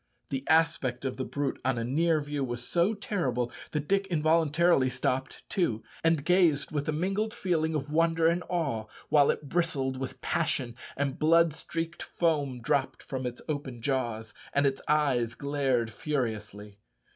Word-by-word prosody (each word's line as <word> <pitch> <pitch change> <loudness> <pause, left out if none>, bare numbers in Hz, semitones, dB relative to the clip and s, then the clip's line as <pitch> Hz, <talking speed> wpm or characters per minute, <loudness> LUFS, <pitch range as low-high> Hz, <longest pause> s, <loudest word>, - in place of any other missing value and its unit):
The 135 -1 -2
aspect 160 -6 +2
of 130 - -2
the 130 - -2
brute 145 -1 -2
on 130 -2 +1
a 115 - -1
near 155 +6 +2
view 145 -1 -3
was 120 -1 -3
so 180 +6 +2
terrible 130 - -1 0.2
that 150 -1 -3
Dick 200 0 +2
involuntarily 160 -3 +3
stopped 130 +1 -2
too, 120 - 0 0.2
and 165 -3 +2
gazed 170 -6 +3
with 145 -1 -2
a - - +3
mingled 195 +7 -1
feeling 160 -3 0
of 150 0 -3
wonder 165 0 +3
and 170 +2 +3
awe, 140 -11 -1 0.2
while 145 -2 +5
it 145 - -1
bristled 140 -5 0
with 130 0 -5
passion, 145 -8 -1 0.2
and 140 -1 -1
blood 165 0 +5
streaked 165 +2 -5
foam 145 -7 0
dropped 140 0 0
from 130 -2 -3
its 120 0 -7
open 140 -5 -4
jaws, 120 -4 -2 0.2
and 140 0 +3
its 135 -1 +1
eyes 130 -6 +2
glared 135 -5 0
furiously. 105 -7 -3
145 Hz, 160 wpm, -29 LUFS, 130-165 Hz, 0.2 s, while